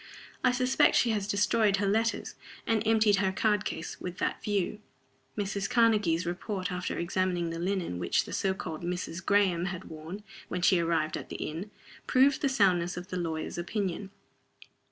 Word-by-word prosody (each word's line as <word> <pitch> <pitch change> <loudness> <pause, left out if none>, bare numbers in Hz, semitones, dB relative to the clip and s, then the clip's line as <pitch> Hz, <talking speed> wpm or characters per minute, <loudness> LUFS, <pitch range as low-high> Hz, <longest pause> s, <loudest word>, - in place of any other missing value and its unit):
I 255 - +5
suspect 255 +1 +3
she 235 - +4
has 205 -2 -1
destroyed 205 0 +2
her 205 - 0
letters, 225 +3 0 0.3
and 225 -2 +2
emptied 220 -2 +4
her 190 -1 +2
card 210 +1 +1
case, 160 +1 -5
with 180 0 -5
that - - -2
view." 205 0 -1 0.6
Mrs. 200 -1 -2
Karnegie's 210 -8 +3
report, 185 +2 -3
after 180 0 -3
examining 175 -1 0
the 165 - -4
linen 180 - -2
which 85 - +1
the - - -8
so 190 -1 0
called 160 -4 -6
"Mrs. 175 +1 -4
Graham" 190 -4 +3
had 180 -3 -5
worn 160 +6 -8 0.2
when 180 -1 -3
she 185 -1 +5
arrived 165 -2 0
at - - -8
the - - -6
inn, 170 +7 -5 0.4
proved 270 +2 +4
the 275 - +2
soundness 180 -8 +2
of 180 +1 -7
the 185 - -3
lawyer's 165 -1 -3
opinion. 190 +1 -3
190 Hz, 175 wpm, -29 LUFS, 175-210 Hz, 0.6 s, I